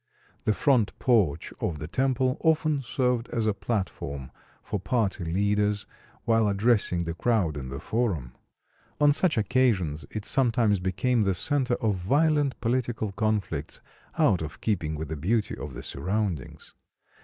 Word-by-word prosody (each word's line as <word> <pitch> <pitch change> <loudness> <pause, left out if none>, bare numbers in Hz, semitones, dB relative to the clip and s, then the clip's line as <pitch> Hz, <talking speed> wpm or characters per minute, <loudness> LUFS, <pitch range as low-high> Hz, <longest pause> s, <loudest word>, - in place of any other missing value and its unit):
The 110 - +3
front 125 -4 +2
porch 95 - +1
of 80 - -1
the 75 - -6
temple 130 - +1
often 155 -2 +2
served 125 -1 -1
as 115 -2 -1
a 110 - +2
platform 95 - -4 0.3
for - - -3
party 105 -7 0
leaders 100 +4 +1 0.4
while 115 -2 +3
addressing 100 -4 +2
the 85 0 -3
crowd 95 -4 +1
in 65 -3 -5
the 70 +2 -5
Forum. 85 - -1 0.7
On 145 -1 +5
such 160 -1 +2
occasions 105 - +1
it 110 -1 -5
sometimes 115 -6 +2
became 110 +7 +1
the 100 -3 +1
center 130 - +1
of 105 -5 0
violent 145 - +2
political 120 -3 -1
conflicts 100 -7 -2 0.4
out 90 - +3
of 80 0 -6
keeping 85 -8 -1
with 75 0 -5
the 80 - -3
beauty 105 +8 0
of - - -7
the - - -7
surroundings. 90 -1 -3
105 Hz, 145 wpm, -27 LUFS, 85-125 Hz, 0.7 s, On